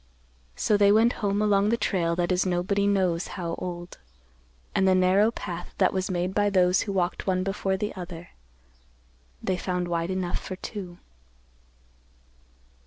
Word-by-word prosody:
So 210 - +2
they 200 0 +5
went 225 +3 +4
home 205 0 +1
along 205 -1 +3
the 235 - +2
trail 170 -7 0
that 175 +1 0
is 180 0 +2
nobody 185 +2 0
knows 185 -4 +1
how 170 -2 -3
old, 175 -1 -6 0.7
and 190 - +2
the 185 - +5
narrow 185 +4 +4
path 175 -6 -7
that - - +3
was 190 0 -1
made 180 0 -1
by 205 0 +2
those 185 -1 +3
who 205 - -3
walked 185 -1 -1
one 185 -1 +1
before 195 0 -1
the 210 +2 -3
other, 175 -2 -8 1.1
they 185 - 0
found 180 -1 -2
wide 170 0 -1
enough 185 -2 -2
for 185 - -6
two. 185 -2 -7
185 Hz, 160 wpm, -26 LUFS, 175-200 Hz, 1.1 s, they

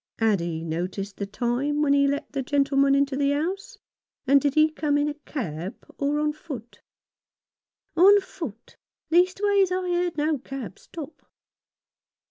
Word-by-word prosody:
Had 220 -4 +2
he 165 -1 -3
noticed 185 +5 -4
the 200 - -3
time 255 +7 -1
when 280 -1 +3
he 280 0 +4
let 285 +2 -2
the 280 -1 -2
gentle 275 +1 0
man 275 0 +5
into 280 -1 +1
the 280 0 +2
house; 385 +11 -3 0.5
and 275 +1 +5
did 285 0 0
he 310 0 +5
come 295 -2 0
in 290 0 +1
a 295 - -2
cab 195 - -5 0.2
or 285 +1 +1
on 300 0 +1
foot? 245 -7 -9 0.6
" - - -57
On 395 +5 +7
foot. 320 - -9 0.3
Leastways, 380 +2 +3
I 365 0 -1
heard 350 -2 0
no 300 -1 +1
cab 260 -6 -7
stop." 315 -2 -10
285 Hz, 160 wpm, -25 LUFS, 245-315 Hz, 0.6 s, On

